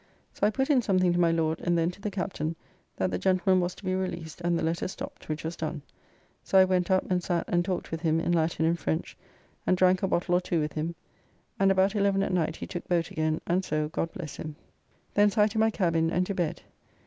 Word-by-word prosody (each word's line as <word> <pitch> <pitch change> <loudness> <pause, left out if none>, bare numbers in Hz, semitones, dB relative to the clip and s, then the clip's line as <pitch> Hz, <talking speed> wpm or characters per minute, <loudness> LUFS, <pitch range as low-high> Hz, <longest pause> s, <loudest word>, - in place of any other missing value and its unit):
So 205 - +2
I - - +3
put 265 +6 0
in 265 -3 +4
something 185 -5 +2
to 175 - +1
my 170 -1 +4
Lord 160 -1 0
and 175 -1 +1
then 165 +1 +1
to 185 - -16
the 210 - -2
Captain 175 -5 -3 0.4
that 95 -1 -1
the 90 - -1
gentleman 185 0 +3
was 175 +1 -2
to - - -13
be 185 - 0
released 175 -3 -4
and 175 0 +1
the - - -2
letter 165 +3 -1
stopped, 185 - -8
which 155 0 -3
was 165 +2 -4
done. 155 -2 -4 0.6
So 195 - +2
I 190 - +8
went 185 -1 +1
up 185 0 +3
and 180 -1 +2
sat 175 -1 -1
and 175 -1 +2
talked 180 -1 -3
with 165 -1 -3
him 165 -1 +2
in 175 - 0
Latin 160 -1 +1
and 170 +1 +1
French, 80 - -2 0.5
and 185 - +3
drank 185 0 +4
a 195 - +1
bottle 175 0 0
or 180 - +4
two 175 -2 -1
with 150 0 -2
him; 160 +2 -3 0.6
and 195 0 +4
about 190 +1 +3
eleven 200 -1 +2
at - - -2
night 160 -3 +1
he - - -6
took 175 - -6
boat 175 0 0
again, 155 -3 -1
and 180 +2 +1
so 155 -2 -1
God 165 +1 -2
bless 160 -5 -7
him. 155 -1 -6 0.6
Thence 205 +1 +3
I 210 - +6
to 220 +1 -1
my 220 0 +4
cabin 165 -6 +1
and 180 +2 +1
to 200 - -3
bed. 175 -4 -2
175 Hz, 250 wpm, -28 LUFS, 165-190 Hz, 0.6 s, I